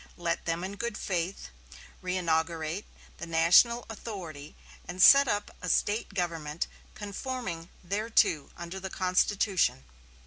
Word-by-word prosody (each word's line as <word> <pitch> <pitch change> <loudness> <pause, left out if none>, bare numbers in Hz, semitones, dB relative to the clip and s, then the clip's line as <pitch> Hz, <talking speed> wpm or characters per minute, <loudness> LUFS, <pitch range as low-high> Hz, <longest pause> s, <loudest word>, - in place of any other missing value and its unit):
Let 170 -1 -2
them 165 +1 -1
in 195 +2 -5
good 235 -1 -3
faith 180 0 -3 0.5
reinaugurate 165 -1 -1 0.3
the 170 - -6
national 170 +9 +5
authority 175 -10 -8 0.3
and 180 +1 -7
set 275 +8 +8
up 205 -2 -2
a 180 - -3
State 205 +3 0
government 165 -4 -2 0.3
conforming 205 -5 -5 0.2
thereto 205 -7 +1
under 170 +2 -6
the 190 0 -6
Constitution. 185 - +1
180 Hz, 115 wpm, -29 LUFS, 165-205 Hz, 0.5 s, set